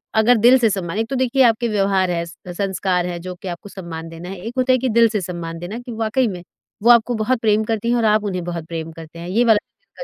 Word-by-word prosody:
अगर 225 +2 +5
दिल 245 +4 +6
से 230 - +3
सम्मान 190 -1 -3
एक 225 - -1
तो 270 - -2
देखिए 260 +1 +2
आपके 235 0 +3
व्यवहार 195 -3 +1
हैं, 170 -1 -1
स 170 - -11 0.2
संस्कार 190 -2 0
है 175 -1 -4
जो 180 +1 -6
कि 185 - -10
आपको 175 +3 -7
सम्मान 165 -4 -8
देना 165 +2 -9
है। 195 - -6
एक 230 - -5
होता 255 0 +2
है - - +4
कि 255 +1 -1
दिल 230 0 +5
से 215 - -1
सम्मान 170 -2 -5
देना 195 +7 -6
कि 245 0 -9
वाक़ई 225 +3 0
में, 180 -4 -5 0.4
वो 235 - +4
आपको 235 0 +4
बहुत 230 +3 0
प्रेम 215 -1 +2
करती 225 +1 -2
हैं 240 - +3
और 230 - +1
आप 215 0 +3
उन्हें 185 -3 -3
बहुत 170 -2 -5
प्रेम 165 -1 -5
करते 165 +1 -11
हैं। 170 - -7
ये 225 +6 +2
वाला 225 -2 +5
जो - - -11
दिल - - -6
205 Hz, 280 wpm, -20 LUFS, 175-230 Hz, 0.4 s, दिल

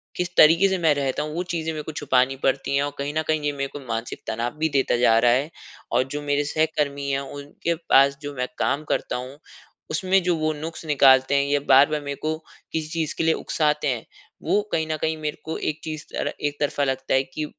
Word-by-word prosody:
किस 180 -1 -2
तरीके 165 +5 +7
से 190 - 0
मैं 160 -2 +4
रहता 140 -1 -1
हूँ। 150 0 -5
वो 175 - -1
चीज़ें 160 -1 -2
मेरे 155 -1 -5
को 160 - -6
छुपानी 135 -3 +1
पड़ती 135 +1 +1
हैं 140 - +2
और 145 - -2
कहीं 140 +1 -3
न - - +3
कहीं 155 -1 +1
ये 145 - +1
मेरे 140 -1 -3
को 145 - -6
मानसिक 115 +1 -4
तनाव 120 +5 -2
भी 160 0 +1
देता 135 -4 +1
जा 115 -2 +4
रहा 120 - +6
है 135 +6 +1 0.4
और 125 +2 +3
जो 150 - -3
मेरे 145 0 0
सहकर्मी 145 -2 -1
हैं, 135 - +1
उनके 145 +4 -4
पास 140 -4 +4
जो 145 -1 -6
मैं 125 0 -2
काम 145 +2 0
करता - - -1
हूँ, 130 +3 -6 0.5
उसमें 185 +4 +2
जो 175 -1 +2
वो 155 0 0
नुक्स 160 +2 -7
निकालते 135 -2 +5
हैं 140 - +3
या 145 - +2
बार-बार 145 +3 +5
मेरे 140 0 -4
को 155 0 -1 0.4
किसी 160 -1 -2
चीज़ 165 -3 -2
के - - 0
लिए 160 0 +4
उकसाते 150 -2 0
हैं, 125 -4 -2 0.4
वो 210 - +2
कहीं 160 -1 0
न 155 0 -2
कहीं 160 0 0
मेरे 150 -1 -4
को 160 - -3
एक 155 +1 -3
चीज़ 155 -1 -5
तरह - - -2
एक 145 0 -5
तरफा 145 0 0
लगता 135 -1 -1
है 130 - +4
कि, 150 +3 -5
145 Hz, 235 wpm, -24 LUFS, 135-155 Hz, 0.5 s, तरीके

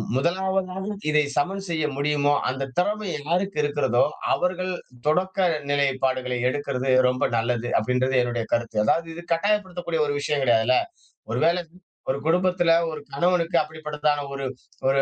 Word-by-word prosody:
முதலாவதாக 190 +4 -1 0.2
இதை 150 0 +4
சமன் 195 +2 0
செய்ய 160 -2 0
முடியுமோ, 145 0 +2 0.2
அந்த 135 +1 -3
திறமை 210 +2 0
யாருக்கு 180 +6 -1
இருக்கிறதோ, 145 -4 +2 0.3
அவர்கள் 185 +1 -1 0.3
தொடக்க 185 +5 +1 0.3
நிலைப்பாடுகளை 130 -3 0
எடுக்கிறது 135 -1 -2 0.2
ரொம்ப 125 - +1
நல்லது 120 +1 -1
அப்படின்றது 125 +4 0
என்னுடைய 120 -1 -1
கருத்து. 115 -2 -1
அதாவது 165 +8 +2
இது 170 - -7
கட்டாயப்படுத்தக்கூடிய 180 -3 0
ஒரு 145 - 0
விஷயோன் 145 -1 0
கிடையாதுல்ல. 120 +1 +4 0.5
ஒரு 120 - 0
வேளை 170 +2 +3 0.5
ஒரு 135 - +1
குடும்பத்துல 180 0 +3 0.2
ஒரு 155 -2 -6
கணவனுக்கு 170 +3 +1
அப்படிப்பட்டதான 150 -1 -2
ஒரு 135 0 -4 0.4
ஒரு 135 0 +4
150 Hz, 130 wpm, -24 LUFS, 130-180 Hz, 0.5 s, இதை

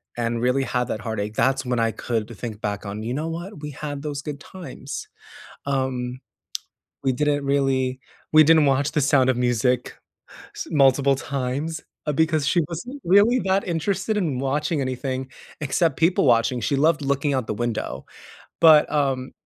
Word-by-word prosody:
and 115 -1 -1
really 125 +2 +2
had 125 -2 0
that 110 - -2
heartache, 105 -1 -3
that's 130 +4 +1
when 125 -1 0
I 115 - +2
could 115 0 -3
think 110 -2 -6
back 100 -1 -3
on, 100 +2 -5
"You 120 +3 -3
know 155 +3 -2
what? 170 +1 -6
We 150 - -5
had 145 0 -6
those 145 -2 -4
good 145 -1 -6
times." 150 -4 -8 0.6
Um, 130 -2 -2 0.8
we 135 - +2
didn't 145 +1 0
really 135 -2 +1 0.3
we 155 0 +8
didn't 160 0 +5
watch 140 +1 +2
The 150 - +2
Sound 135 -2 +3
of 125 - +2
Music 125 0 +1 0.8
multiple 140 -1 +4
times 140 +4 -3 0.3
because 160 -2 +2
she 175 - +3
wasn't 245 - -7
really 205 +7 +5
that 190 0 +1
interested 190 +5 -1
in 155 -10 -1
watching 145 +3 0
anything 130 0 -3 0.3
except 155 +4 +1
people 170 +3 +3
watching, 120 +1 +3
she 140 - 0
loved 155 +2 +3
looking 140 +1 0
out 130 -4 -1
the - - -1
window, 120 +1 -3 0.6
but, 155 -2 +7
um, 135 -3 0
140 Hz, 165 wpm, -23 LUFS, 125-155 Hz, 0.8 s, we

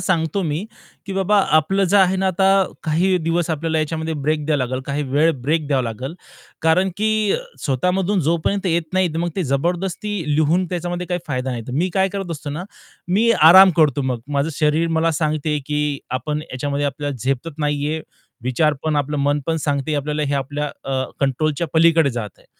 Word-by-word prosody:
सांगतो 180 +1 0
मी, 160 +4 -2 0.4
की 195 - -4
"बाबा, 195 +2 +2 0.2
आपलं 195 +6 +1
जे - - +6
आहे 190 -1 +4
ना 190 0 0
आता 190 +1 +1 0.4
काही 175 +4 +2
दिवस 165 +1 0
आपल्याला 160 +1 -1
याच्यामध्ये 160 +1 -2
ब्रेक 150 +1 -1
द्यावा 155 -2 +1
लागेल, 130 +1 -3
काही 140 +1 -1
वेळ 155 +4 +3
ब्रेक 155 +2 0
द्यावा 135 -3 +2
लागेल." 125 +6 -5 0.5
कारण 170 +4 +3
की 215 +1 +1 0.5
स्वतःमधून 180 +8 +1
जोपर्यंत 190 +4 0
येत 170 -1 +1
नाही, 185 -1 +3
मग 170 +1 -1
ते 190 - 0
जबरदस्ती 175 - -1 0.2
लिहून 160 +4 +2
त्याच्यामध्ये 175 0 -3
काही 175 -1 -2
फायदा 130 -1 -2
नाही. 120 -2 -4
मी 165 +8 +1
काय 190 0 +3
करत 195 -3 -4
असतो 150 -2 -5
ना, 155 +5 -5 0.4
मी 215 +6 +3 0.2
आराम 190 +1 +9
करतो 150 -4 +3
मग. 125 -3 -2
माझं 140 +1 0
शरीर 155 +3 +1
मला 165 +1 +2
सांगते, 155 0 0
की 150 -1 -1 0.2
आपण 150 +3 -3
ह्याच्यामध्ये 145 0 -3
आपल्याला 145 0 -3
झेपत 135 +4 -2
नाहीये. 150 +1 -1 0.4
विचार 145 +4 +2
पण, 155 -1 +1
आपलं 145 +1 -1
मन 145 +1 +1
पण 165 0 0
सांगते, 145 +1 0
आपल्याला 150 +1 -1
हे 140 - -1
आपल्या 145 +2 -2 0.2
अ, 130 -1 0 0.2
कंट्रोलच्या 150 +4 0
पलीकडे 165 -2 +4
जात 115 -4 -4
आहे. - - -24
155 Hz, 180 wpm, -20 LUFS, 145-175 Hz, 0.5 s, आराम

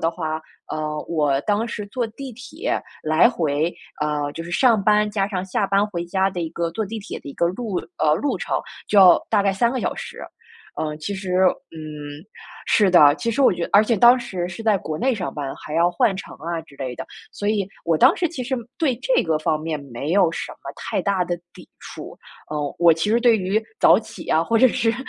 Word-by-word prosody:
的 165 - +1
话， 160 -2 -4 0.3
呃， 155 0 -3
我 145 -4 +1
当 210 +2 0
时 210 -3 -5
坐 245 +1 -1
地 260 +4 -8
铁 255 +2 -3 0.3
来 155 +8 +5
回， 160 -3 0 0.3
呃， 150 -1 -1
就 165 - -6
是 170 - -8
上 225 +2 +3
班， 210 +1 +3
加 200 -2 0
上 185 -3 -3
下 190 +2 -1
班 200 +1 +2
回 175 -4 -4
家 190 +2 +1
的 180 - -5
一 165 - -3
个 170 0 -2
坐 220 +5 -2
地 225 +3 -6
铁 200 - -7
的 - - -10
一 - - -8
个 170 - +1
路 195 +2 -3 0.2
呃， 150 -1 +3
路 285 - -1
程， - - -2 0.3
就 205 - +4
要 185 -3 +8
大 210 -2 +4
概 195 - +3
3 235 +4 +2
个 260 - -2
小 - - -1
时。 - - -8 0.6
呃， 150 -1 -3
其 180 +6 -4
实 190 -2 -4 0.4
嗯， 150 -2 -8 0.4
是 205 -3 +4
的， 150 -6 +7
其 230 +5 -2
实 275 - +1
我 255 - +6
觉 170 -1 -3
而 205 - +7
且 230 0 +1
当 240 +5 +7
时 185 -7 -4
是 185 +5 -8
在 215 -3 +3
国 155 -3 -5
内 260 +9 +1
上 195 -6 -4
班， 140 -3 -4
还 150 - -8
要 170 +2 +3
换 195 +3 +1
乘 190 - -8
啊 165 +2 -4
之 140 -3 -19
类 130 -2 -4
的， - - -6 0.3
所 205 - -3
以 205 -3 0 0.2
我 165 -2 +1
当 - - +6
时 345 - 0
其 270 -6 -5
实 265 +2 -1 0.2
对 305 -7 +2
这 260 - +3
个 160 -2 +1
方 155 0 0
面 155 -2 -3
没 140 +7 -3
有 185 -4 +4
什 - - -5
么 - - -9
太 - - -3
大 195 -3 +1
的 175 0 -2 0.2
抵 - - -15
触， - - -9 0.3
呃， 150 -1 -3
我 170 -1 +6
其 165 +6 -1
实 230 +2 +3
对 235 -2 +5
于 195 +2 0 0.2
早 - - +7
起 - - -10
啊， 160 - +3
或 230 - +1
者 255 +3 +6
是， 225 0 0
180 Hz, 245 characters per minute, -22 LUFS, 155-215 Hz, 0.6 s, 要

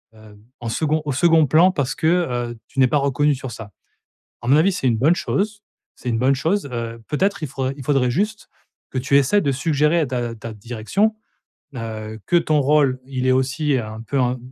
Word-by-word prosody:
Heu, 110 -1 -16 0.2
en 115 - -4
second 155 +6 0
au 145 - -1
second 160 +3 +4
plan, 165 +7 +5
parce 140 -8 -2
que, 160 - 0
heu, 125 -9 0
tu 135 - -7
n'es 130 - +6
pas 135 - +1
reconnue 140 +1 +1
sur 130 -1 -7
ça. 110 -2 -9 0.7
À - - -7
mon 135 - +6
avis 175 +6 +4
c'est 180 -8 -2
une 115 -2 +1
bonne 150 +9 +4
chose. 205 +2 -2 0.3
C'est 125 - -4
une 115 - 0
bonne 130 +3 +3
chose, 165 +5 -1
heu, 115 -1 -5
peut-être 190 +5 0
il - - -4
faudrait 135 0 -3
il 135 - -8
faudrait 135 -3 +2
juste, 210 - -2 0.4
que 130 - -3
tu 140 +2 +2
essaies 140 +10 +3
de 140 - +1
suggérer 150 +3 +1
à 155 - +1
ta 120 -2 -2
à - - -7
ta 115 +1 -7
direction, 120 - -1 0.6
heu, 110 -1 -6
que 175 - +2
ton 155 -3 +2
rôle, 140 -2 +2
il 130 -1 -3
est 130 - +4
aussi, 135 +3 0
heu, 125 -4 0
un 110 +1 -8
peu 135 +4 -1
un 125 0 0
135 Hz, 225 wpm, -21 LUFS, 120-155 Hz, 0.7 s, n'es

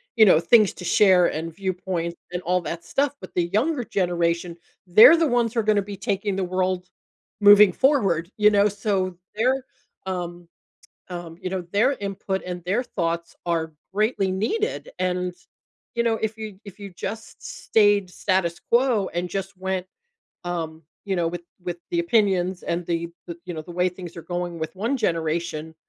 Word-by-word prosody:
you 220 -2 +7
know, 180 -5 +6
things 210 +4 +5
to 180 - -9
share 185 -2 +5
and 160 +1 -4
viewpoints 180 -3 -3 0.2
and 180 0 -3
all 180 +1 +1
that 170 0 -5
stuff, 285 0 0
but - - -10
the 175 - +2
younger 250 +6 +1
generation, 175 -3 -1 0.3
they're 215 - +9
the 330 -1 +3
ones 240 -3 +1
who 235 - 0
are - - +1
gonna 210 -1 +3
be 200 0 -7
taking 200 +1 -1
the 195 - -1
world 185 0 -1 0.5
moving 205 -1 +8
forward, 195 - +2
you 210 0 +6
know, 205 0 +4
so 195 -2 -1 0.2
their, 255 +4 +1 0.4
um, 175 -2 -5 0.6
um, 175 -2 -7
you 185 - -3
know, 190 0 -2
their 230 +7 +3
input 195 -4 -3
and 180 -1 -5
their 200 +7 +1
thoughts 170 -6 -3
are 165 -2 -1 0.2
greatly 210 -2 +1
needed, 230 - -1
and, 180 0 -1 0.6
you 235 - +2
know, 230 -1 +2
if 220 0 -2
you 215 -3 -7
if 200 0 -12
you 200 -1 -7
just 220 +5 -7 0.3
stayed 205 -3 +4
status 180 -2 0
quo 235 -5 +3
and 175 +1 -2
just 195 +1 -4
went, 190 0 -2 0.6
um, 165 -2 -4 0.2
you 195 -2 -1
know, 170 -1 +1
with 175 +1 -5 0.2
with 175 -1 -4
the 345 - 0
opinions 195 - +1
and 170 +1 -2
the 170 0 -1 0.2
the, 170 -2 -6
you 175 - -5
know, 155 - -5
the 165 - -13
way 180 +1 +2
things 180 -1 -10
are 170 - -7
going 175 -1 -4
with 160 +4 -5
one 230 +8 0
generation, 165 -5 -2
185 Hz, 180 wpm, -24 LUFS, 175-210 Hz, 0.6 s, they're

